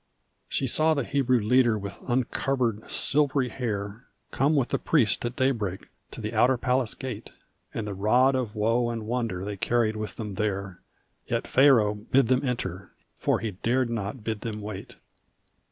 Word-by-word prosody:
She 135 - 0
saw 155 +5 +2
the 140 - 0
Hebrew 130 -1 +2
leader 120 +1 +3
with 100 -3 -6
uncovered 120 -2 0
silvery 140 -3 +2
hair 110 -2 -4 0.3
Come 145 +4 +2
with 135 -4 +1
the - - 0
priest 125 -11 +2
at 120 +1 -3
daybreak 110 -8 -1 0.2
to - - -10
the 110 0 -4
outer 125 +4 +4
palace 125 -1 0
gate, 125 -5 -6 0.4
And 110 - -4
the 105 - -4
rod 120 +7 +3
of 125 -5 -2
woe 115 +3 +1
and 115 -2 -4
wonder 115 -6 -2
they 105 -1 -4
carried 115 +1 +1
with 110 0 -5
them 105 -3 -5
there, 100 -2 -3 0.5
Yet - - -1
Pharaoh 125 -6 +5
bid 115 +4 +1
them 130 +1 +3
enter 95 -8 -3 0.2
for - - 0
he 110 - -2
dared 120 +6 0
not 110 +1 -4
bid 110 -1 -3
them 110 -3 -4
wait. 105 -2 -7
115 Hz, 170 wpm, -26 LUFS, 105-130 Hz, 0.5 s, Pharaoh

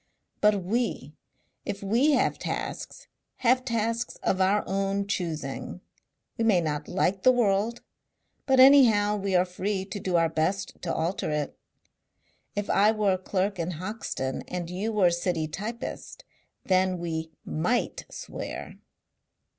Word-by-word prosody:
But 210 -2 +3
we, 230 +7 -2 0.5
if 200 0 -5
we 240 +10 +3
have - - +1
tasks, - - -5 0.4
have 255 +2 +4
tasks 230 -1 -1
of 190 - +1
our 195 +3 +3
own 195 +1 -1
choosing. 165 -3 -4 0.6
We - - +2
may 215 -5 +4
not 150 -2 -2
like 190 +1 0
the 255 - +6
world, 225 -1 +1 0.6
but 265 -1 +4
anyhow 235 -7 +7
we 195 -1 -1
are 180 0 +4
free 190 +2 -3
to 205 +1 -6
do 185 -2 -1
our 165 -1 +4
best 185 +5 -2
to 175 - -2
alter 165 +2 -1
it. 150 -1 -2 1.0
If 205 0 -2
I 205 +2 +4
were 210 -3 +2
a - - 0
clerk 190 +1 -1
in 170 +2 -2
Hoxton 170 -7 -4
and 175 -1 -4
you 200 +5 -2
were 210 -4 +3
a - - -2
city 170 -2 -1
typist, 215 +9 -6 0.4
then 185 -1 +2
we 160 -2 -3 0.2
MIGHT 220 +11 -1
swear." - - -7
195 Hz, 145 wpm, -27 LUFS, 175-215 Hz, 1.0 s, anyhow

